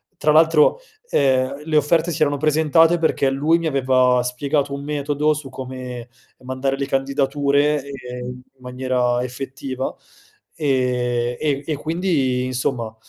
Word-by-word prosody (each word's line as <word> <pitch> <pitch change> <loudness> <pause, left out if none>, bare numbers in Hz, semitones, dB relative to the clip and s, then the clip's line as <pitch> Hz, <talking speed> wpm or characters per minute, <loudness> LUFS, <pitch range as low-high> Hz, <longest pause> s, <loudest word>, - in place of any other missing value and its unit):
tra 150 -3 +1
l'altro, 160 - +4 0.3
ehm, 135 +1 +1
le 160 -1 -2
offerte 160 +3 +2
si 155 - -5
erano 145 -1 +2
presentate 160 +3 +3
perché 140 -4 +1
lui 150 +5 +2
mi 170 - -4
aveva 130 -3 +3
spiegato 140 +3 -1
un 140 - -7
metodo 145 +1 0
su 150 -3 -7
come 130 -2 -7 0.4
mandare 130 +1 -2
le 140 - -2
candidature, 140 +2 +1
ehm, 125 -3 -8
in 125 0 -8 0.2
maniera 125 -1 -1
effettiva, 130 +1 -5 0.6
ehm, 125 -4 0
e 145 -2 -1
e 155 - -2
quindi, 150 -6 0
insomma, 125 -3 -2
135 Hz, 135 wpm, -21 LUFS, 125-150 Hz, 0.6 s, l'altro